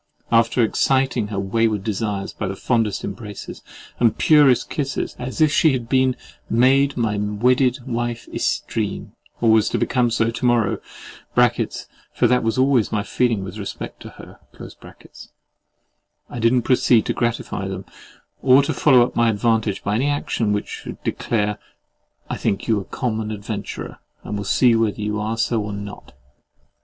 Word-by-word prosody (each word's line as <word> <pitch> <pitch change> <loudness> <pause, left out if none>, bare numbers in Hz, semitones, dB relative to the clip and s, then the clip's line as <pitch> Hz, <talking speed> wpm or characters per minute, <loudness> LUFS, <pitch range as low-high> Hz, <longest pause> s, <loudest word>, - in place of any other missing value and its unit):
After 115 +1 +3
exciting 130 0 +1
her 100 -2 -4
wayward 105 +1 0
desires 105 -2 -3
by 105 - -4
the 95 - -4
fondest 110 -3 0
embraces 105 0 -7 0.4
and 120 - +5
the - - -10
purest 145 -5 +4
kisses, 140 -2 -3
as 130 +5 -5
if 155 -2 +5
she 155 -1 +4
had 120 -3 -3
been 130 0 +2 0.3
"made 135 +4 +3
my 110 -3 0
wedded 125 +5 +2
wife 120 0 -3
yestreen," - - -2 0.3
or 115 -2 +4
was 110 -1 +4
to - - -1
become 125 -2 +1
so 115 0 +1
to 115 - -8
morrow 120 -4 +2 0.6
(for - - 0
that 125 +1 +3
was 115 +2 -1
always 130 -4 +2
my 105 -1 0
feeling 115 -5 0
with 95 +3 -8
respect 100 - -7
to - - -10 0.7
her)—I 120 - -16
did 115 0 +3
not 125 -2 +2
proceed 120 -2 +3
to - - -1
gratify 115 -4 -2
them, 95 -1 -6 0.6
or 135 +1 +6
to - - -1
follow 130 -5 +5
up - - -8
my 120 0 +3
advantage 110 -1 0
by 100 - -1
any 125 +7 +1
action 130 -6 -1
which 105 0 -1
should - - -8
declare, 105 -3 -1 0.7
"I - - -4
think 100 -1 -2
you 110 -3 +2
a 95 - -7
common 110 -4 -3
adventurer, 105 -2 -6 0.2
and - - -5
will 100 0 -4
see 120 +3 +4
whether 115 -2 0
you 105 0 -2
are 110 +2 -2
so 115 0 0
or 105 0 -5
not!" 100 0 -8
115 Hz, 165 wpm, -21 LUFS, 105-125 Hz, 0.7 s, or